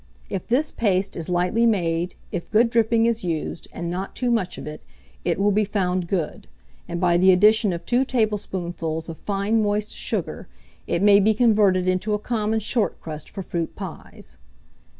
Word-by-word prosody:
If 195 -3 -4
this 275 +6 +1
paste 195 -3 0
is 165 +1 -5
lightly 180 +6 +2
made, 175 -4 0 0.2
if 175 - -5
good 230 +2 +3
dripping 230 -1 +3
is 230 -1 0
used, 165 -1 -3
and 170 - -5
not 185 +3 -4
too 245 -1 0
much 195 -6 0
of - - -7
it, 150 0 -7 0.4
it 170 - 0
will 205 +1 +3
be 210 +2 +2
found 185 -3 -1
good; 170 -4 -3 0.4
and 170 -1 -4
by 175 -1 +3
the 190 +2 +6
addition 210 +3 +5
of 170 -1 -5
two 250 +2 +2
tablespoonfuls 180 -9 -2
of 165 - -7
fine 205 +2 0
moist 210 0 -1
sugar, - - -3 0.4
it 170 +2 0
may 205 -1 +7
be 215 +2 +3
converted 205 -5 +3
into 185 +3 +1
a - - 0
common 220 0 -1
short 220 +1 -1
crust 155 -2 -7
for 195 - -6
fruit 170 -2 -3
pies. - - -9
195 Hz, 180 wpm, -23 LUFS, 175-220 Hz, 0.4 s, may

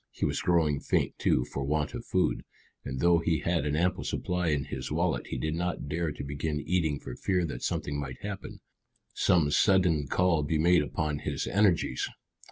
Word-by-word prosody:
He - - -3
was - - -1
growing 80 -5 +2
faint, - - 0
too, - - +2
for 70 - -4
want 75 +2 -1
of - - -5
food, - - +1 0.4
and 65 -2 -4
though 85 -1 +5
he 85 -1 0
had 85 -3 0
an 75 - 0
ample 90 +3 +1
supply 90 -1 -1
in 75 -3 +1
his 65 - -5
wallet - - 0
he - - -4
did 80 0 -2
not 85 -2 -2
dare 80 +2 -1
to 75 - -7
begin 75 +2 -3
eating 80 -2 0
for - - -8
fear 90 -3 0
that 75 - -5
something 70 0 -2
might 65 -3 -6
happen, 100 -2 -6 0.5
some 80 -5 +3
sudden 85 -5 +3
call 90 +1 +2
be 75 +2 0
made 85 +1 +4
upon 75 0 -2
his - - -3
energies. 100 -4 +2
80 Hz, 190 wpm, -29 LUFS, 75-90 Hz, 0.5 s, though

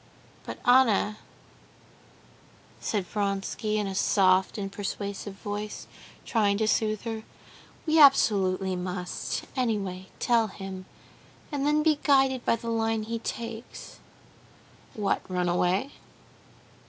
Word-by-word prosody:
"But, - - -5
Anna," 235 -4 +4 1.6
said 205 -4 -1
Vronsky, 200 +2 -2
in 210 - 0
a 195 - -3
soft 190 0 +3
and 195 -1 -4
persuasive 200 0 -5
voice, 205 +1 -5 0.4
trying 205 -4 +2
to 220 0 +1
soothe 215 -1 +1
her, 225 -2 -4 0.6
"we 320 0 +3
absolutely 195 -9 +5
must, 180 0 -4
anyway, 200 -7 -2
tell 230 -2 +2
him, 190 -1 -8 0.6
and 285 -1 -1
then 300 +1 +3
be 310 -2 +3
guided 270 -3 +3
by - - +3
the 230 0 -5
line 225 -1 0
he 230 +1 -4
takes." 230 0 -7 1.0
"What, 205 -2 0
run 180 -1 0
away?" 180 +8 +1
210 Hz, 115 wpm, -27 LUFS, 195-230 Hz, 1.6 s, absolutely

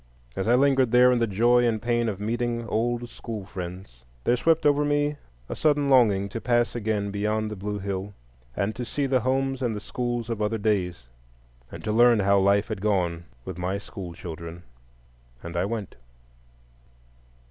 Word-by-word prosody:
As 95 - -2
I 120 - +5
lingered 135 -1 +3
there 125 +1 +6
in 125 - +2
the 115 - +2
joy 120 +4 +3
and 115 -2 +1
pain 120 0 0
of 100 -3 -5
meeting 120 +2 -2
old 120 +2 -1
school 110 -4 -7
friends, 90 - -8 0.2
there 120 - +3
swept 160 +4 +2
over 145 0 +4
me 145 0 +1 0.3
a - - -5
sudden 145 -2 +2
longing 105 -7 +4
to 115 - -5
pass 120 -1 +1
again 105 -3 -1
beyond 105 +1 -1
the - - -4
blue 105 +1 -4
hill, 100 0 -4 0.4
and 100 +2 -1
to 125 - -4
see 140 +4 -2
the 130 -1 +2
homes 135 +1 0
and 120 -4 0
the - - -4
school 120 +2 -3
of 115 -2 -3
other 105 +2 0
days, 95 - -1 0.7
and - - -9
to 110 - -1
learn 120 0 +5
how 100 0 +4
life 100 +3 +3
had 110 -4 -4
gone 90 -5 0 0.2
with 90 -2 -6
my 90 +2 -1
school 95 -3 -8
children; 85 0 -8 0.8
and 85 0 -7
I 85 +2 +1
went. 105 -2 -4
110 Hz, 180 wpm, -26 LUFS, 100-120 Hz, 0.8 s, there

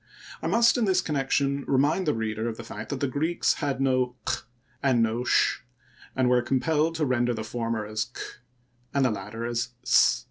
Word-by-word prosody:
I - - -2
must 230 +6 +4
in 230 - +2
this 190 -2 +3
connection 140 -3 0
remind 145 +7 +2
the 150 - +2
reader 110 0 -2
of 110 - -6
the 115 - -7
fact 110 -1 -8
that 140 -3 -4
the 140 - +2
Greeks 155 +6 +1
had 140 -2 -1
no 130 -2 +1
q - - 0 0.4
and 130 -4 +3
no 115 +2 0
sh, 125 - +2 0.6
and 130 -1 +2
were 125 0 +4
compelled 150 +6 +1
to 160 -2 0
render 120 -2 +1
the 110 - -4
former 115 -1 -3
as 110 +1 -2
k 125 - -13 0.8
and 140 -1 +3
the 125 - +2
latter 105 +3 -5
as 120 +1 -1
s. - - +4
130 Hz, 200 wpm, -26 LUFS, 115-145 Hz, 0.8 s, must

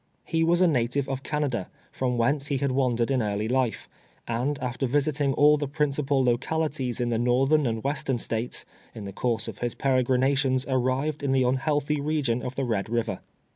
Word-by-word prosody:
He 165 0 0
was 170 +2 +3
a 180 - +6
native 130 -2 0
of 135 -1 -3
Canada, 140 -9 -2 0.2
from 125 -2 -1
whence 140 +5 +1
he 140 - 0
had 140 0 0
wandered 125 -2 +1
in 130 -2 +2
early 105 0 -1
life, 125 -1 0 0.4
and 125 +5 -1
after 130 0 -2
visiting 145 +1 +1
all 150 +2 +5
the 145 -1 -2
prin 150 +1 0
cipal 135 -1 +1
localities 130 +1 -1
in 120 -1 0
the 115 -1 0
northern 135 +4 +3
and 115 -1 -2
western 140 -2 -1
States, 115 +1 -2 0.3
in 105 - -7
the 100 - -7
course 115 0 -1
of - - -7
his 120 -1 -2
peregrinations, 130 0 +2
arrived 130 +3 0
in 140 -2 0
the 130 -1 +3
un 125 +2 +2
healthy 145 +1 0
region 140 -5 0
of 125 0 -5
the 135 - -1
Ked 110 -4 -1
River. 115 0 -1
130 Hz, 195 wpm, -26 LUFS, 120-145 Hz, 0.4 s, a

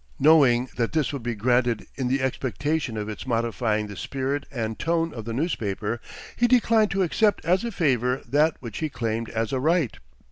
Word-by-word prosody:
Knowing 135 -5 +5
that 115 -2 0
this 155 -3 0
would 140 - -4
be 120 0 -3
granted 120 +1 +1
in 130 -2 -2
the 130 +1 0
expectation 130 0 -1
of 105 -1 -3
its 110 +4 -7
modifying 115 -2 0
the 100 -1 -8
spirit 135 +7 -3
and 110 -4 -3
tone 165 -1 0
of 115 -3 -7
the 115 - -4
newspaper, 115 - -2 0.3
he 240 - +3
declined 230 -3 +4
to 195 0 +1
accept 205 +3 +1
as 180 +4 +2
a 235 - -2
favor 130 - +1
that 150 +5 +2
which 115 -5 -6
he 155 - -1
claimed 115 -3 -3
as 115 0 -2
a 130 - +1
right. 155 -2 +1
130 Hz, 190 wpm, -25 LUFS, 115-160 Hz, 0.3 s, Knowing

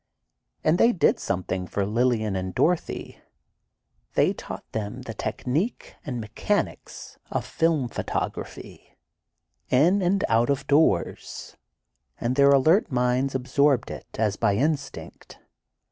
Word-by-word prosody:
But 155 +3 +3
they 235 +1 +5
did 175 - +2
something 90 -1 -2
for 100 +1 -1
Lillian 110 -1 +1
and 95 0 -4
Dorothy: 175 0 -1 1.0
They - - +3
taught - - -8
them 105 -2 -4
the - - -6
technique 160 - -3
and 130 -7 -4
mechanics 115 - -3
of - - -2
film 160 -6 +1
photography, - - -5 0.7
in 170 +10 +4
and 185 +2 +2
out 115 +2 +2
of 140 0 0
doors, 145 - +1 0.6
and 120 +2 -1
their 140 0 +6
alert 155 +9 +4
minds 125 +2 +1
absorbed 130 0 +2
it - - -8
as 105 -2 +1
by 100 - +2
instinct. 145 +5 -3
130 Hz, 120 wpm, -25 LUFS, 110-155 Hz, 1.0 s, their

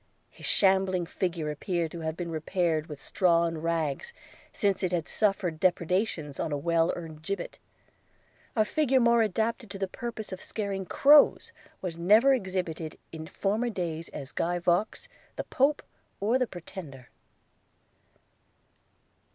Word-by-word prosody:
His - - -7
shambling 190 -2 +3
figure 170 -3 -2
appeared 165 +2 -2
to 170 - -7
have 160 0 -3
been 170 -2 -4
repaired 160 -1 0
with 150 -3 -8
straw 170 0 +2
and 165 -1 -3
rags, 165 - -1 0.4
since 200 -3 0
it 185 -2 0
had 175 -2 -1
suffered 190 -6 0
depredations 175 -4 0
on 160 - -2
a 145 - 0
well 165 +2 +2
earned 160 -3 -8
gibbet 200 +5 -5 0.5
– - - -34
A 215 -2 +3
figure 270 +1 +2
more 235 -1 +4
adapted 225 +2 -1
to 195 - -6
the 195 0 -2
purpose 230 0 -6
of 185 - -6
scaring 195 -3 -4
crows, 290 - +5 0.3
was 170 -3 -4
never 215 +10 +6
exhibited 180 -8 -3
in 160 -1 -7
former 215 +8 -1
days 170 -6 -4
as 140 -1 -7
Guy 175 +1 -1
Vaux, 175 +4 0 0.3
the - - -3
Pope, 285 +3 +1 0.4
or 225 +6 +2
the 250 - +1
Pretender. 160 - -10
180 Hz, 145 wpm, -28 LUFS, 165-210 Hz, 0.5 s, never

